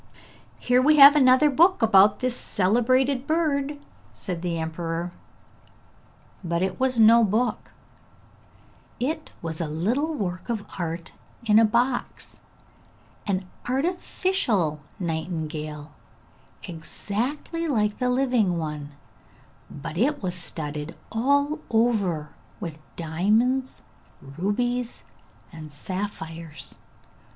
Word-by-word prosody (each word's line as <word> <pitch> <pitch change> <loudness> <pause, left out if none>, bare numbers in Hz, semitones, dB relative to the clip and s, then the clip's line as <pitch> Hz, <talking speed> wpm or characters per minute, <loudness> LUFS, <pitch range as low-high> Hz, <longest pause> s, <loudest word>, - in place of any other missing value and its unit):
'Here 250 0 +2
we 305 +3 +4
have 280 +1 +10
another 260 +1 +6
new 290 - 0
book 345 -2 +4
about 205 -1 +5
this 255 -1 0
celebrated 250 +7 +1
bird,' 295 -3 0 0.3
said 175 -3 -6
the 175 -2 -2
emperor. 165 +1 -3 1.3
But 170 0 -1
it 190 -1 -2
was 260 -2 +1
no 230 +1 +7
book; 220 +4 0 1.3
it 310 +5 -2
was 165 0 -3
a 165 - -1
little 235 - -1
work 185 -3 -4
of 220 -4 -2
art 165 -1 -4 0.3
in 215 -1 +6
a 225 - +6
box, 245 +4 -1 0.9
an 190 -2 -1 0.2
artificial 265 - 0 0.2
nightingale, 160 -3 -4 0.7
exactly 240 - -4
like 210 -7 0
the 250 -1 +1
living 250 -8 +2
one, 150 -2 -5 0.8
but 165 +4 -6
it 285 +2 +1
was 180 -2 -1
studded 150 -3 -3 0.2
all 285 +6 +1
over 205 -10 +1 0.3
with 160 -2 -7
diamonds, 215 +11 0 0.4
rubies 230 - -2 0.5
and 155 -2 -10
sapphires. 165 -4 -6
210 Hz, 105 wpm, -25 LUFS, 165-255 Hz, 1.3 s, have